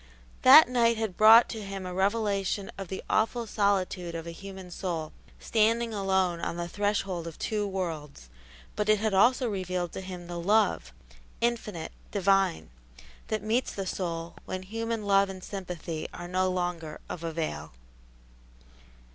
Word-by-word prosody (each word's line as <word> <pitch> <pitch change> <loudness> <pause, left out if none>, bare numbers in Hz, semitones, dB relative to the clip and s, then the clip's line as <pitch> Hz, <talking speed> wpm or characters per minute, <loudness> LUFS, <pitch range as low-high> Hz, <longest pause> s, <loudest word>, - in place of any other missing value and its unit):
That 280 +4 +10
night 235 -2 +2
had 220 -5 -2
brought 220 +3 +8
to 220 - -5
him 195 -2 -6
a 180 - -5
revelation 200 0 0
of 195 -1 -6
the 190 - -6
awful 230 +2 +1
solitude 190 -5 0
of 165 0 -5
a 170 - -6
human 190 +1 -10
soul, 170 -4 -4 0.3
standing 230 +1 +1
alone 190 -3 +1
on 170 - -3
the 170 0 -3
threshold 195 -3 -1
of 165 - -8
two 210 -2 -1
worlds; 160 - -5 0.5
but 210 0 -1
it 215 - +6
had 215 0 -1
also 245 +6 +4
revealed 185 -4 -2
to - - -6
him 180 -2 -8
the 175 0 -5
Love 200 - +2 0.5
Infinite, 215 -8 -2 0.2
Divine 195 - +1 0.6
that 215 -1 -2
meets 230 +4 0
the 195 - -3
soul 170 -2 -4
when 185 0 -5
human 225 +2 -3
love 195 -1 +4
and 185 -1 -8
sympathy 175 -5 -5
are 175 - -7
no 185 +1 +1
longer 175 -4 -3
of 170 - -6
avail. 155 - -4
190 Hz, 155 wpm, -28 LUFS, 175-215 Hz, 0.6 s, That